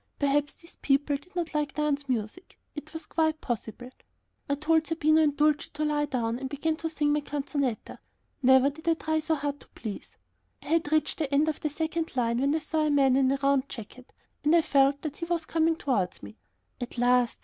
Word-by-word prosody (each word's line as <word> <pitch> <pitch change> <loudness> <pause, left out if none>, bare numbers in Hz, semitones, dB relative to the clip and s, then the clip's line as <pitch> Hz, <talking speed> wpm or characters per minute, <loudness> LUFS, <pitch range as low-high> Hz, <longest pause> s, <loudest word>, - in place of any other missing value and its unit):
Perhaps 285 0 +1
these 335 - -16
people 285 +1 +2
did 360 +6 -23
not 340 -3 -2
like 295 -2 -1
dance 290 -2 -1
music; 240 - -4 0.2
it 295 +1 -8
was 320 -1 -7
quite 315 -1 0
possible. 240 0 -5 0.6
I 280 - +2
told 315 +2 +1
Zerbino 315 -1 +3
and 290 -2 +2
Dulcie 300 0 +2
to 305 +1 -1
lie 295 -1 0
down, 235 -4 -1
and 270 - -5
I 275 +2 -4
began 315 +3 0
to 325 0 -3
sing 295 -2 +1
my 295 - +1
canzonetta. 280 -4 -3 0.4
Never 265 +1 +5
did 320 +3 -14
I 330 - +4
try 315 0 -1
so 315 +1 0
hard 285 -1 -3
to - - -17
please. 215 -3 -7 0.5
I - - -10
had 320 -2 +1
reached 310 +1 +1
the 295 -3 -2
end 290 +2 +3
of 310 - -1
the 305 - -1
second 320 +1 -3
line, 235 -1 +1
when 280 +3 +2
I - - +3
saw 310 0 -1
a - - +1
man 275 -3 +4
in 265 -1 +3
a 275 - +1
round 275 -1 +2
jacket, 245 +3 -10 0.3
and 300 +3 +4
I 335 - +5
felt 275 0 +3
that 295 -2 -5
he 335 - -4
was 335 -1 -1
coming 325 0 +2
towards 220 - -1
me. 100 +1 -11 0.4
At 245 - -6
last! 245 0 +3
290 Hz, 220 wpm, -28 LUFS, 270-315 Hz, 0.6 s, Never